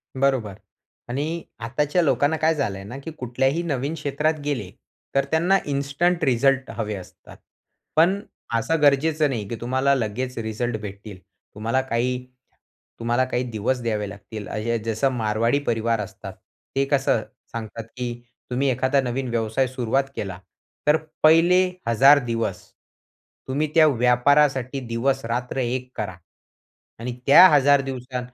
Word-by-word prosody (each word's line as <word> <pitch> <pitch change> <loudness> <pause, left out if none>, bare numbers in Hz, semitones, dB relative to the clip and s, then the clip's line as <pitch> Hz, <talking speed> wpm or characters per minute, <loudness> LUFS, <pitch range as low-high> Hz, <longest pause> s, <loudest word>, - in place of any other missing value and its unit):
बरोबर. 130 -7 0 0.5
आणि 155 +7 -2 0.2
आताच्या 150 +8 0
लोकांना 150 0 +2
काय 160 +1 +2
झालंय 100 -10 -2
ना, 115 +7 -8
की 150 +4 -7
कुठल्याही 135 +5 0
नवीन 140 -2 -2
क्षेत्रात 150 +1 -1
गेले 120 -11 -2 0.4
तर 135 0 +3
त्यांना 175 +5 +3
इन्स्टंट 145 +5 0
रिझल्ट 135 0 +2
हवे 105 -2 -2
असतात. 95 -2 -12 0.6
पण 175 +5 +4 0.4
असं 160 +6 -1
गरजेचं 150 +2 +3
नाही, 110 -6 -3
की 115 - -4
तुम्हाला 130 +3 +2
लगेचं 125 +1 -3
रिझल्ट 110 +1 -2
भेटतील. 100 -1 -8 0.4
तुम्हाला 115 +5 0
काही 125 0 -1 0.7
तुम्हाला 120 +2 +1
काही 130 -1 -1
दिवस 115 +4 -1
द्यावे 105 -3 -1
लागतील. 105 +1 -9
असं 115 +2 -2
जसं 115 +4 +1
मारवाडी 115 +3 +1
परिवार 115 -2 0
असतात. 105 - -7 0.4
ते 135 0 +2
कसं 135 -5 +2 0.3
सांगतात, 115 -1 -6
की 120 +2 -5 0.4
तुम्ही 130 +3 +1
एखादा 130 +2 +2
नवीन 130 0 -3
व्यवसाय 115 +2 0
सुरुवात 130 +1 0
केला 95 -3 -5 0.5
तर 150 +1 +6 0.3
पहिले 165 +3 +6 0.3
1,000 135 +5 +6
दिवस 115 -6 -2 0.9
तुम्ही 140 +4 0
त्या 160 -1 +7
व्यापारासाठी 130 +1 +3
दिवस 130 +4 0
रात्र 120 +3 -3
एक 125 0 -2
करा. 100 -4 -4 0.8
आणि 120 +2 -4
त्या 175 +7 +10
1,000 145 -1 +5
दिवसा 130 -1 -5
130 Hz, 135 wpm, -23 LUFS, 115-140 Hz, 0.9 s, त्या